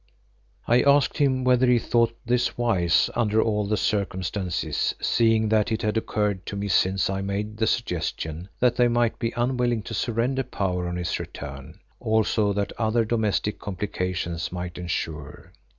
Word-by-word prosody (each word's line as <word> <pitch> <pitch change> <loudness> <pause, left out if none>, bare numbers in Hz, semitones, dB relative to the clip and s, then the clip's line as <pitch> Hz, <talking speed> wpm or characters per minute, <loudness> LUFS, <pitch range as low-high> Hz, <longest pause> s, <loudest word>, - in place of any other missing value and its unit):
I 120 +2 +5
asked 140 0 +3
him 130 -3 +2
whether 125 0 +4
he 125 0 +5
thought 115 0 +1
this 120 +1 0
wise 95 -8 +2
under 110 -2 +1
all 105 -2 +1
the 105 +1 0
circumstances, 95 -3 -1
seeing 110 -1 +2
that 110 0 +2
it 110 - -1
had 105 0 0
occurred 105 -3 -1
to - - -4
me 100 0 -3
since 95 0 +2
I 95 0 -2
made 105 +2 -3
the 110 0 +1
suggestion, 85 -4 -2
that 120 -1 +2
they 125 - +5
might 120 -1 +1
be 115 - -1
unwilling 120 -2 0
to 115 - -7
surrender 120 +6 0
power 90 -7 -2
on 90 - -3
his 90 -2 -2
return, 75 +3 -8 0.2
also 110 -2 +1
that 100 0 -2
other 115 0 +2
domestic 110 -2 0
complications 90 -4 -3
might 90 0 -5
ensue. 80 -4 -5
105 Hz, 160 wpm, -25 LUFS, 90-120 Hz, 0.2 s, I